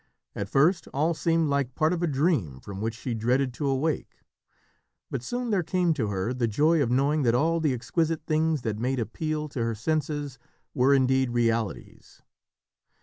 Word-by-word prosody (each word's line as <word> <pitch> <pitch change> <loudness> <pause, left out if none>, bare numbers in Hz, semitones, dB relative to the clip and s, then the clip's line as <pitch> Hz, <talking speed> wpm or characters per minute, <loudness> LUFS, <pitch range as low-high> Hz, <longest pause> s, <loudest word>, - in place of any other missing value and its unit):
At 100 -1 -4
first 160 - +3
all 155 +4 +2
seemed 165 0 +1
like 140 -3 -1
part 155 +2 +2
of 175 - -2
a 175 - +1
dream 135 - 0
from 100 +4 -8
which 115 +1 -2
she 120 +1 -4
dreaded 125 +3 +1
to 145 +3 -3
awake, 140 +3 -1 1.0
but - - -2
soon 245 - -3
there 195 -3 +2
came 175 0 +1
to 125 -8 -1
her 100 +4 -2
the 125 -2 0
joy 150 +9 +3
of 125 - +1
knowing 140 +5 +2
that 120 -3 +2
all 165 +6 +2
the 155 -3 +1
exquisite 160 +5 -1
things 155 -3 +1
that 110 -2 -2
made 130 +3 -1
appeal 155 +6 -3
to 130 - -4
her 115 -1 -1
senses 145 +2 -2 0.3
were 130 +2 +3
indeed 130 -1 +2
realities. 115 -3 -2
140 Hz, 180 wpm, -26 LUFS, 120-160 Hz, 1.0 s, first